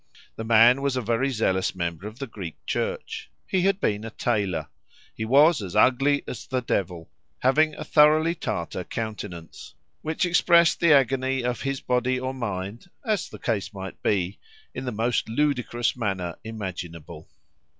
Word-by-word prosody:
The 110 - -5
man 115 +3 +6
was 140 -2 0
a - - 0
very 120 +5 +1
zealous 95 -8 0
member 85 +1 -3
of 110 +2 -10
the 140 - -4
Greek 95 - -8
Church. - - -3 0.2
He 185 - 0
had 195 +1 +2
been 105 - 0
a 115 - -5
tailor. 105 -6 -1 0.4
He 110 - -4
was 145 +5 +5
as 95 -2 -6
ugly 135 +6 +4
as - - -7
the 130 -2 -1
devil, 90 -7 -2 0.3
having 150 +4 +3
a - - -6
thoroughly 155 +2 +5
Tatar 90 - -4
countenance, 105 -7 -7 0.3
which 160 +3 -1
expressed 170 -1 +4
the 170 -2 +4
agony 135 -1 +3
of 125 -1 -2
his 135 0 -2
body 125 +1 0
or 130 +1 -3
mind, 105 - -5 0.2
as 215 -5 0
the - - -10
case 105 -2 -2
might 95 0 -7
be, 95 -1 0 0.3
in - - -5
the 125 - -2
most 115 +1 0
ludicrous 125 -2 0
manner 95 -7 -2
imaginable. 90 -7 -7
120 Hz, 160 wpm, -25 LUFS, 100-135 Hz, 0.4 s, man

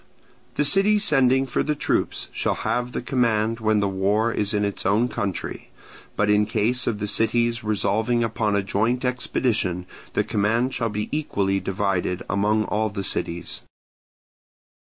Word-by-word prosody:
The 150 - +2
city 195 +7 +5
sending 135 -9 +3
for 135 +2 -1
the 150 - 0
troops - - -1
shall - - -1
have 125 0 -2
the - - -4
command 115 -3 +1
when 110 -1 +2
the 100 - +1
war 100 +4 +1
is 105 -3 -1
in 105 -1 +1
its 100 - -3
own 105 +6 +2
country: 100 -6 -4 0.5
but 105 - +1
in 105 0 +3
case 115 +3 0
of 115 - 0
the 105 - -3
cities 115 +2 +1
resolving 110 +3 +1
upon 110 -2 0
a 100 - +1
joint 115 +6 0
expedition 115 -7 -1 0.3
the 105 - +1
command 115 +4 0
shall 115 -2 -1
be 105 0 -3
equally 100 -10 0
divided 95 -2 -1
among 105 +2 +2
all 110 0 -1
the 100 -1 -5
cities. 85 -2 -3
110 Hz, 155 wpm, -23 LUFS, 100-120 Hz, 0.5 s, city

